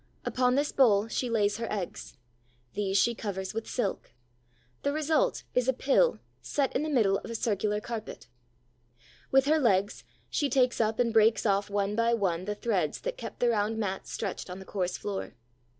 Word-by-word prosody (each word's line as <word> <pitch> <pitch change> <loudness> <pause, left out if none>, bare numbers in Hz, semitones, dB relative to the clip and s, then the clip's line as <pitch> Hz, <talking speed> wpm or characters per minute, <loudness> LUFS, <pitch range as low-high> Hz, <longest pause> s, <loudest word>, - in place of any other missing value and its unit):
Upon 250 0 +2
this 290 +2 +1
bowl 220 -6 +4
she 250 +2 -1
lays 210 -3 +1
her 230 0 -4
eggs. 195 -8 -5 0.6
These 200 -1 0
she 235 - +3
covers 195 -4 -4
with 225 +1 -4
silk. 210 - -3 0.7
The 285 - 0
result 315 - +1
is 250 0 +1
a 260 - +4
pill 285 - +3 0.2
set 280 -2 -1
in 260 - +2
the 310 - -2
middle 210 -9 +3
of - - -10
a 230 - -4
circular 210 -1 0
carpet. 215 - -7 1.0
With 270 0 +4
her 310 +2 +3
legs 195 - +1 0.2
she 290 - 0
takes 255 -3 +2
up 220 0 +1
and 235 -2 +1
breaks 220 0 +4
off 200 -1 +1
one 200 0 0
by 230 +1 +3
one 185 -5 -1
the 210 +1 -2
threads 195 -9 -1
that - - -3
keep - - -8
the 245 - +2
round 220 0 0
mat 195 -3 -3
stretched 195 -3 -4
on 180 - -6
the 190 - -10
coarse 185 -3 -2
floor. 200 -2 -5
220 Hz, 185 wpm, -29 LUFS, 200-250 Hz, 1.0 s, bowl